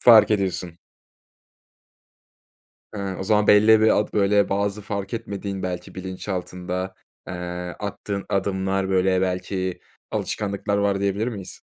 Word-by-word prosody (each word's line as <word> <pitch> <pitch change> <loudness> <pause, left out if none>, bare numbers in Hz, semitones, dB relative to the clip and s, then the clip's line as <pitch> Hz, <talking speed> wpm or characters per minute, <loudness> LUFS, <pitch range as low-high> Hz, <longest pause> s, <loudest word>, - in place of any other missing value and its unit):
Fark 115 -3 +8
ediyorsun. 95 -4 -1 2.2
Hıı. 100 -2 -3
O - - -3
zaman 105 +1 +3
belli 110 +1 +7
bir 110 - +5
ad 105 - 0
böyle, 100 0 +3
bazı 100 +1 -1
fark 100 0 -4
etmediğin, 100 -3 -4
belki 90 -1 -4
bilinçaltında, 95 0 -4 0.3
eee, - - -4 0.5
attığın 100 -1 -4
adımlar, 95 0 0
böyle, 95 0 +3
belki 95 0 -2 0.3
alışkanlıklar 100 -1 -1
var, 100 -1 +1
diyebilir 100 +4 0
miyiz? 100 -6 -7
100 Hz, 120 wpm, -24 LUFS, 95-105 Hz, 2.2 s, Fark